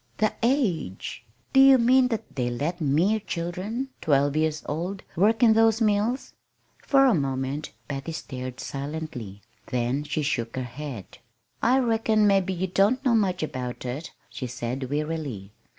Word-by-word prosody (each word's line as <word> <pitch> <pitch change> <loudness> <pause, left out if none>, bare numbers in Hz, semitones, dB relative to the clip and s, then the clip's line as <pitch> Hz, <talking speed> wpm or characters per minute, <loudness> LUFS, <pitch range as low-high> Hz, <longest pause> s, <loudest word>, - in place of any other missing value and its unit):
"The 215 -1 +2
age! 200 - -1 0.3
Do 270 - +6
you 270 0 +8
mean 250 +2 +5
that 225 - -4
they 125 -3 0
let 150 +9 -3
mere 165 +9 +2
children, 195 +8 -4
twelve 145 -1 +2
years 155 0 0
old, 175 +6 -4
work 215 +6 +3
in 225 -2 +7
those 225 0 +4
mills?" 220 +3 +1 0.5
For 275 -1 +5
a 255 - +5
moment 135 -1 -2 0.2
Patty 140 +3 -4
stared 130 -4 -6
silently. 140 -8 -6 0.2
Then 125 +3 -1
she 150 +1 -2
shook 120 -5 -2
her 130 - -2
head. 125 -4 -8 0.4
"I 250 +3 +4
reckon 225 -3 +2
mebbe 195 -2 +3
ye 185 0 -1
don't 205 +9 +2
know 250 - +4
much 190 -6 +1
about 125 -4 -5
it," 135 +6 -5 0.2
she 125 - -6
said 125 +2 -4
wearily. 145 -9 -3
160 Hz, 150 wpm, -26 LUFS, 135-220 Hz, 0.5 s, you